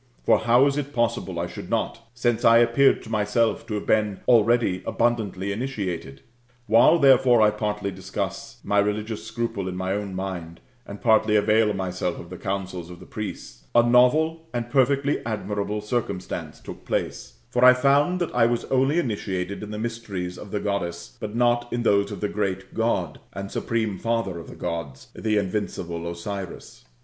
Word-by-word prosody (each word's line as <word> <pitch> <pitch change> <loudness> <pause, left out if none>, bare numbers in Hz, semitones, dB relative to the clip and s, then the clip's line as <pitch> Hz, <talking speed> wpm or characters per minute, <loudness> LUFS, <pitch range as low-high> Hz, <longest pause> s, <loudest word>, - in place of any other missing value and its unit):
For - - +4
how 120 +4 +4
is 140 0 +1
it 145 0 -3
possible 95 -7 -1
I 85 - -1
should - - -8
not; - - -1 0.2
since 120 -2 0
I 115 0 +7
appeared 120 +4 +4
to 115 - -10
myself 110 +1 +1
to 105 - -3
have 105 - -4
been 105 -2 +1
already 115 -5 +3
initiated? 100 - -2 0.4
While, 115 +9 +6
therefore, 130 -4 +5
I 105 -1 +5
partly 105 -1 -2
discuss 95 0 -5
my 100 - +2
religious 105 +2 -1
scruple 110 -4 -3
in 90 - -4
my 95 +1 -1
own 100 -2 -4
mind, 90 -3 -5 0.3
and 100 0 -9
partly 110 -2 +4
avail 105 +1 +3
myself 90 -2 -2
of 85 - -11
the 90 - -8
counsels 95 -3 -4
of 90 -1 -10
the - - -12
priests, 105 -1 -7
a 120 - +7
novel 155 +7 +3
and 120 0 -3
perfectly 140 +1 +2
admirable 105 -1 -3
circumstance 105 -4 -4
took - - -10
place: - - -3
for 125 - +1
I 125 0 +9
found 140 +7 +3
that 175 - -2
I 115 -2 +4
was 120 0 -1
only 135 +4 +3
initiated 100 - -2
in 105 - -7
the 105 - -5
mysteries 105 -6 -4
of 105 - -9
the 105 - -2
Goddess, 100 -4 -3
but 105 +1 -5
not 120 0 +2
in 120 0 -1
those 100 -2 +2
of 100 - -7
the 105 - +1
great 95 -2 -3
God, 95 -9 -1
and 100 +1 -6
supreme 110 -5 -2
Father 115 -6 -1
of 85 - -10
the - - -10
Gods, 85 -6 -5
the 110 -1 0
invincible 90 -4 -3
Osiris. 95 +2 -7
105 Hz, 175 wpm, -24 LUFS, 95-120 Hz, 0.4 s, I